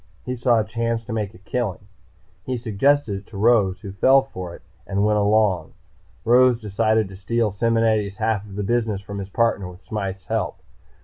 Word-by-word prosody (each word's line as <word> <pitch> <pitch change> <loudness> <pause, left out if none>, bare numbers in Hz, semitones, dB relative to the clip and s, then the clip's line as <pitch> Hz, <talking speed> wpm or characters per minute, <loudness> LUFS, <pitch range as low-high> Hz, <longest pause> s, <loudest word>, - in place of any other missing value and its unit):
He 125 - -3
saw 120 -1 +3
a - - +1
chance 115 +1 -2
to 120 - -5
make 105 -2 -3
a - - -12
killing. 100 0 -4 0.6
He 130 +3 -2
suggested 115 0 +1
it 100 - -20
to 105 - -10
Rose, 105 -4 +3
who 100 -3 -7
fell 130 +7 +4
for 90 -10 -8
it - - -16 0.2
and 100 +1 +1
went 105 0 +3
along. 100 -5 +2 0.5
Rose 125 0 +5
decided 110 0 +1
to 95 - -10
steal 110 +3 0
Simonetti's 110 -2 +1
half 110 -2 0
of 100 -2 -11
the 105 - -2
business 110 -2 0
from 100 0 -6
his 95 0 -6
partner 100 -4 0
with 90 +2 -14
Smythe's 95 -3 -4
help. - - -2
110 Hz, 190 wpm, -22 LUFS, 100-115 Hz, 0.6 s, Rose